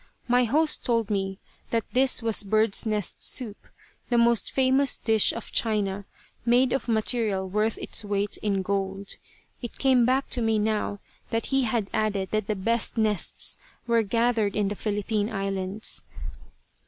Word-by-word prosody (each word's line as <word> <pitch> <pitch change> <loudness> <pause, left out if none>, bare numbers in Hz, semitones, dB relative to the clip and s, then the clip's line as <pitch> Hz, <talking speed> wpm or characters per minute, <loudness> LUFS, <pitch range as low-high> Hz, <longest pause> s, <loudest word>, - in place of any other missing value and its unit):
My 245 0 +4
host 300 +6 0
told 230 -3 0
me 195 -1 -1 0.3
that 230 -1 0
this 255 -1 +3
was 225 -2 +1
birds' 215 +1 +2
nest 210 -3 -1
soup, 225 -6 0 0.4
the 240 - +2
most 235 -1 +2
famous 265 +1 +2
dish 220 -2 +3
of - - -8
China, 205 -3 -1 0.4
made 245 +2 +3
of 265 - -2
material 220 -3 +1
worth 210 +3 0
its - - 0
weight 205 0 -1
in 200 -2 -1
gold. 195 0 -2 0.4
It 240 - -7
came 260 -3 +4
back 260 +3 +2
to 245 - +2
me 225 -1 +2
now 210 -1 -1 0.3
that 225 0 -1
he 270 -1 +3
had 220 -3 -1
added 205 -3 -1
that 215 -2 -1
the 215 - 0
best 230 +5 0
nests 215 -4 0 0.3
were 235 -1 +3
gathered 225 -1 +1
in 205 -2 +1
the 205 - -3
Philippine 210 0 -1
Islands. 195 0 -3
220 Hz, 155 wpm, -26 LUFS, 200-235 Hz, 0.4 s, My